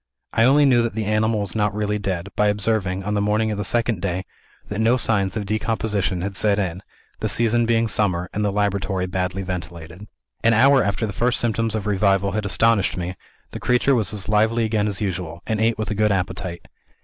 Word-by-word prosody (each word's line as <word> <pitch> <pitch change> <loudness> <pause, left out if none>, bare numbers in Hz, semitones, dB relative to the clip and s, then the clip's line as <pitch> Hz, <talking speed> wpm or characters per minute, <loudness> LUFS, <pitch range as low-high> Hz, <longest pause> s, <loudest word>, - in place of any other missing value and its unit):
I 115 - +4
only 145 +3 +5
knew 125 -3 +4
that 115 -2 -2
the 110 -1 -2
animal 110 +1 +1
was 100 -4 -3
not 105 -2 0
really 105 0 -1
dead, 95 -2 -3
by 105 - +2
observing, 100 -2 0
on 105 +2 -2
the 105 - +1
morning 105 +2 +1
of 105 - -3
the - - -1
second 115 -2 +1
day, 95 -1 -2 0.4
that 105 - -4
no 115 +3 +3
signs 100 -4 +1
of 105 - -3
decomposition 105 -3 -1
had 100 0 -4
set 100 +1 +2
in 95 -2 -2 0.4
the - - -1
season 120 0 +2
being 115 0 +2
summer, 90 -5 0
and 105 - -1
the 100 - +1
laboratory 100 -2 -1
badly 90 +1 -3
ventilated. 90 +1 -7 0.4
"An 115 0 +4
hour 135 +3 +5
after 100 +3 -1
the 100 - -5
first 120 +5 0
symptoms 115 -1 0
of 110 - -3
revival 100 -1 +2
had 105 +1 -2
astonished 100 +1 +2
me, 90 +1 -4 0.4
the - - -6
creature 125 +3 +2
was 110 -7 +1
as 105 -3 -2
lively 110 +2 +2
again 110 -1 0
as 100 -1 -1
usual, 90 -4 -4
and 110 -1 -1
ate 115 0 +2
with 110 0 -3
a - - +1
good 105 0 +2
appetite. 90 -2 -3
105 Hz, 215 wpm, -22 LUFS, 95-110 Hz, 0.4 s, only